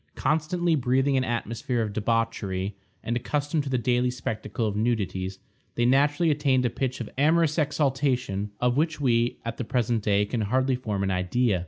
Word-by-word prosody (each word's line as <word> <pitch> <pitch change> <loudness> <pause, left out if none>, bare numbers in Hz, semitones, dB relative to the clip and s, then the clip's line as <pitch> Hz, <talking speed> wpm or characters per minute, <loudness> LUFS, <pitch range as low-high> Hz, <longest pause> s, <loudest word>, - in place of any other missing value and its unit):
Constantly 160 +4 +1
breathing 135 0 +2
an 130 - +2
atmosphere 120 0 -2
of 105 -2 -4
debauchery, 105 -3 -1 0.3
and 120 - -1
accustomed 145 +5 -1
to 140 - -5
the 130 - +1
daily 125 +1 +1
spectacle 115 -1 -3
of 105 -2 -1
nudities, 100 -4 -1 0.4
they 120 - +1
naturally 145 +5 +3
attained 135 -4 +2
a 120 - +1
pitch 130 +1 -2
of 115 - -5
amorous 160 +1 +3
exaltation 130 -8 0
of 125 +1 +1
which 155 0 +1
we, 120 -3 +2
at 115 - -4
the - - -2
present 120 -1 0
day, 105 -1 +2
can 115 +2 -2
hardly 130 +5 +1
form 105 -6 -3
an 95 - 0
idea. 95 +3 +1
125 Hz, 175 wpm, -26 LUFS, 110-140 Hz, 0.4 s, naturally